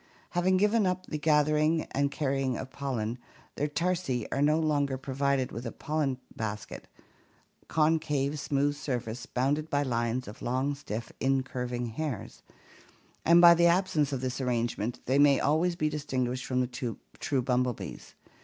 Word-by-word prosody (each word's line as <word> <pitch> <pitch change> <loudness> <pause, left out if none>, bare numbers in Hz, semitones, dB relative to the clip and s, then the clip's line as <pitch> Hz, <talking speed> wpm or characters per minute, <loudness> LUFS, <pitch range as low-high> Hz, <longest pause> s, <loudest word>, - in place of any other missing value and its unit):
Having 185 +1 +2
given 210 +1 +3
up 185 0 -1
the 155 - -4
gathering 155 +1 +3
and 140 +1 +1
carrying 135 -3 -1
of 130 0 -7
pollen, 125 -4 -3 0.3
their 145 - -1
tarsi 165 -6 -1
are 140 - 0
no 150 +2 +4
longer 145 -4 +1
provided 135 0 0
with 115 - -6
a 115 - -4
pollen 150 -4 -1 0.2
basket 105 -1 -5 0.8
(concave 150 -2 +1
smooth 140 +1 0
surface, 125 -5 -4
bounded 145 +5 0
by 145 0 +1
lines 120 -1 -1
of 105 - -10
long 130 +4 0
stiff 115 -5 -6
incurving 125 -2 -1
hairs) 120 -1 -5 0.8
and 170 +1 +7
by 170 -1 +10
the 170 0 +4
absence 170 -5 +2
of 135 -2 -2
this 130 +1 -3
arrangement 120 -2 -1
they 135 +3 +2
may 145 -2 +6
always 165 +4 +2
be 155 -2 0
distinguished 130 -4 -2
from 125 -1 +1
the 125 -2 -3 0.2
true 135 -3 0
bumblebees. 125 -2 -2
140 Hz, 150 wpm, -29 LUFS, 125-155 Hz, 0.8 s, by